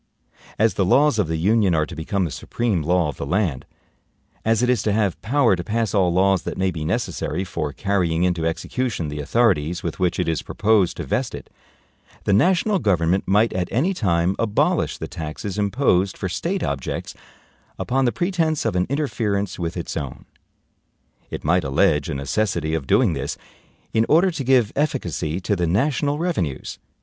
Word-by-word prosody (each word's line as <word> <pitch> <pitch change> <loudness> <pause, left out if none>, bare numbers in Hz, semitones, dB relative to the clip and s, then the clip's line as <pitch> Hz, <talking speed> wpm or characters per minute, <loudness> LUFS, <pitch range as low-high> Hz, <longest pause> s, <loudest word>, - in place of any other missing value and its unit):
As 110 +1 +3
the 95 - +1
laws 135 +6 +3
of 100 - +2
the 80 0 -1
Union 100 +1 +3
are 80 -1 +2
to 85 - -9
become 90 +4 -1
the 80 - -4
supreme 110 -2 -1
law 85 0 +1
of - - -7
the - - -4
land, 85 -6 -1 0.8
as 115 +1 +2
it - - +3
is 125 -4 +2
to 105 - 0
have 100 -3 0
power 125 -3 +3
to 85 - -5
pass 115 +1 -1
all 95 -4 +3
laws 95 +1 +3
that - - -5
may 95 0 +1
be 80 -3 -5
NECESSARY 80 +2 -2
for 75 -5 -3
carrying 90 -3 0
into 85 -3 +1
execution 95 0 -2
the 75 0 -5
authorities 90 - +1
with 85 -3 -4
which 90 -1 0
it 90 - 0
is 80 -1 0
proposed 105 -4 +1
to - - -3
vest - - -2
it, - - -11 0.7
the 100 - +1
national 185 - +3
government 90 - +1
might 105 +4 +3
at 90 -1 -1
any 160 +11 +1
time 90 - +1
abolish 110 -2 +1
the - - -5
taxes 80 +6 -5
imposed 100 -3 +1
for 95 - -3
State 170 - -2
objects 70 -2 -3 0.6
upon 135 +1 0
the 120 - +2
pretense 165 -4 0
of 115 - 0
an 90 0 +1
interference 110 -10 -1
with 85 +1 -3
its 85 - -4
own. 70 -5 -5 1.0
It - - -6
might 85 +3 +2
allege 70 +1 +2
a 80 - -2
necessity 80 +3 -1
of 75 -5 -2
doing 115 -10 +3
this 70 0 -4 0.6
in 110 +1 +2
order 175 +5 +4
to 155 -5 -4
give 125 -4 +3
efficacy 95 - -1
to 100 - 0
the 90 -2 0
national 145 - +1
revenues. 140 - -2
95 Hz, 185 wpm, -22 LUFS, 85-115 Hz, 1.0 s, order